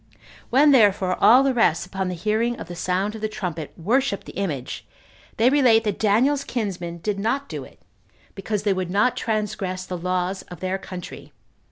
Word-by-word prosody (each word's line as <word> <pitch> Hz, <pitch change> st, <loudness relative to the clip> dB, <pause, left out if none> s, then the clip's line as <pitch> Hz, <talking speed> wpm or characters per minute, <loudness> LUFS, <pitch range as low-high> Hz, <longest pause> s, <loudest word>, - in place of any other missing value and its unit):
When 285 Hz, +4 st, +5 dB
therefore 200 Hz, -7 st, +4 dB
all 250 Hz, +4 st, +7 dB
the 270 Hz, -1 st, +2 dB
rest, 205 Hz, -10 st, +2 dB
upon 190 Hz, 0 st, -3 dB
the 180 Hz, -, -3 dB
hearing 220 Hz, +6 st, -1 dB
of -, -, -7 dB
the 175 Hz, -, -7 dB
sound 185 Hz, +4 st, -1 dB
of 220 Hz, -, -8 dB
the 215 Hz, -, -1 dB
trumpet, 170 Hz, -7 st, -5 dB
worshipped 230 Hz, +4 st, 0 dB
the -, -, -9 dB
image, 150 Hz, -10 st, -4 dB, 0.5 s
they 230 Hz, -, +4 dB
relate 250 Hz, -6 st, +5 dB
that 210 Hz, -3 st, -2 dB
Daniel's 250 Hz, +7 st, +2 dB
kinsmen 180 Hz, -7 st, -4 dB
did 205 Hz, -2 st, -1 dB
not 265 Hz, +7 st, -1 dB
do -, -, -6 dB
it, -, -, -16 dB, 0.5 s
because 205 Hz, +1 st, -3 dB
they 205 Hz, -2 st, +2 dB
would 185 Hz, -2 st, -3 dB
not 205 Hz, +7 st, +2 dB
transgress 210 Hz, -4 st, -2 dB
the 180 Hz, -1 st, -5 dB
laws 180 Hz, +2 st, -1 dB
of 180 Hz, -, -9 dB
their 185 Hz, +1 st, -2 dB
country. 180 Hz, -2 st, -9 dB
200 Hz, 185 wpm, -23 LUFS, 185-225 Hz, 0.5 s, all